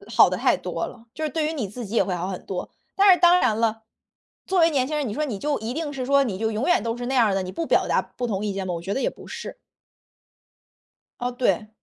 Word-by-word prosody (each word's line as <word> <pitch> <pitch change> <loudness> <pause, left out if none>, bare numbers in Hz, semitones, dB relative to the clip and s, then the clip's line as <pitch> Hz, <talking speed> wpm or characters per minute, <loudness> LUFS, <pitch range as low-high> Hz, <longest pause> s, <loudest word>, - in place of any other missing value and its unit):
好 - - +7
得 - - -2
太 - - +3
多 - - -4
了， 230 -1 -12
就 315 - -4
是 310 - 0
对 310 0 -1
于 315 - -2
你 260 -10 -3
自 230 +5 -7
己 215 - -5
也 - - +4
会 190 - -2
好 175 +1 -3
很 190 -2 -6
多， 185 -2 -4 0.3
但 395 0 +7
是 355 - 0
当 350 +1 +6
然 215 -8 +1
了， 225 -1 0 0.6
作 375 -1 +1
为 330 - +6
年 265 -5 +1
轻 305 - -3
人， 295 - -1
你 - - -4
说 305 +6 -1
你 235 -8 -4
就 290 +7 -1
一 220 +3 -4
定 310 0 -3
是 265 -3 -4
说 280 +1 +4
你 210 -8 -3
就 220 +2 -1
永 220 +5 -1
远 355 +1 +4
都 230 0 -2
是 245 0 -5
那 265 - -1
样 240 -3 +5
儿 200 - +1
的， 195 - 0
你 185 - -6
不 330 - -3
表 - - +3
达 - - +2
不 245 - -6
同 205 -2 -2
意 205 - -1
见 195 -1 -3
吗？ 180 - -2
我 165 - -5
觉 190 +3 -3
得 270 - -1
也 - - +1
不 - - -14
是。 - - -7 1.6
哦， 245 0 -1
对。 245 -3 0
245 Hz, 315 characters per minute, -24 LUFS, 210-295 Hz, 1.6 s, 好